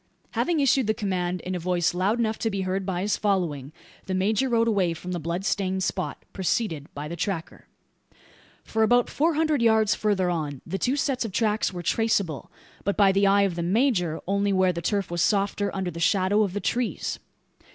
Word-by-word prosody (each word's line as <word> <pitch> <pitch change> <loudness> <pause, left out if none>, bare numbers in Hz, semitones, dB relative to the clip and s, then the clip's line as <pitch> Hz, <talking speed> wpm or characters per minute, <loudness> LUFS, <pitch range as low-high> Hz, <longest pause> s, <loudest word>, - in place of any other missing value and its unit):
Having 340 -3 0
issued 270 -3 +3
the 220 - +1
command, 180 -3 -2
in 185 - -4
a 180 - -2
voice 175 0 0
loud 190 +6 +1
enough 220 -2 -1
to 225 - 0
be 195 -2 -2
heard 190 +1 -2
by 180 -2 -1
his 205 +2 0
following, 170 -9 -1 0.4
the 190 - -1
major 215 +7 +1
rode 230 -1 +2
away 190 -6 +1
from 180 +2 -7
the 175 - -2
bloodstained 185 +3 -1
spot, 185 0 -3
preceded 180 -6 -2
by 145 +1 -5
the 170 - -5
tracker. 170 -1 -4 1.0
For 220 - -2
about 245 +2 +3
four 320 +2 +1
hundred 310 -3 +1
yards 220 -2 +4
further 200 -4 0
on, 150 -5 -4
the 195 +3 -4
two 255 +2 +1
sets 275 -3 0
of 225 - -4
tracks 215 +1 +1
were 175 -2 -6
traceable; 200 -7 0 0.3
but 200 - -1
by 200 -2 +5
the 195 +1 +3
eye 200 +1 +4
of 195 -3 +1
the 170 - -3
major, 180 - +1
only 200 +1 +1
where 185 -1 +3
the 170 - -4
turf 200 +1 -1
was 175 -1 -1
softer 200 0 +1
under 190 -2 -2
the 170 - -8
shadow 190 +4 +2
of 200 -4 0
the 205 - -2
trees. 245 -1 -2
195 Hz, 205 wpm, -25 LUFS, 180-220 Hz, 1.0 s, by